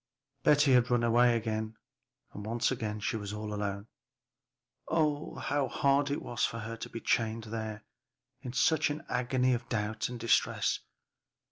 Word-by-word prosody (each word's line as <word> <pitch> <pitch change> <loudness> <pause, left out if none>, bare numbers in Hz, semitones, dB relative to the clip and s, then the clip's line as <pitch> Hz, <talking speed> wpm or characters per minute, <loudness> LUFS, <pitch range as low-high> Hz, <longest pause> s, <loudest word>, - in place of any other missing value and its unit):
Betty 145 -2 +5
had 125 -1 +4
run 120 -1 +2
away 120 +1 +4
again, 110 -1 -3 0.6
and 110 0 -2
she 110 - 0
was 105 -1 -5
all 105 0 -4
alone. 100 -1 -3 1.0
Oh, 155 -2 0
how 145 -2 0
hard 140 +3 +2
it 145 - -2
was 120 - -3
for 115 - 0
her 115 +1 -5
to 115 - -7
be 115 - -6
chained 115 0 0
there 110 -1 -5 0.6
in 125 -3 -5
such 155 +4 +3
an 150 +3 -5
agony 125 +1 +1
of 120 0 -3
doubt 110 -1 -1
and 125 -1 -6
distress! 115 0 +2
115 Hz, 150 wpm, -31 LUFS, 110-130 Hz, 1.0 s, Betty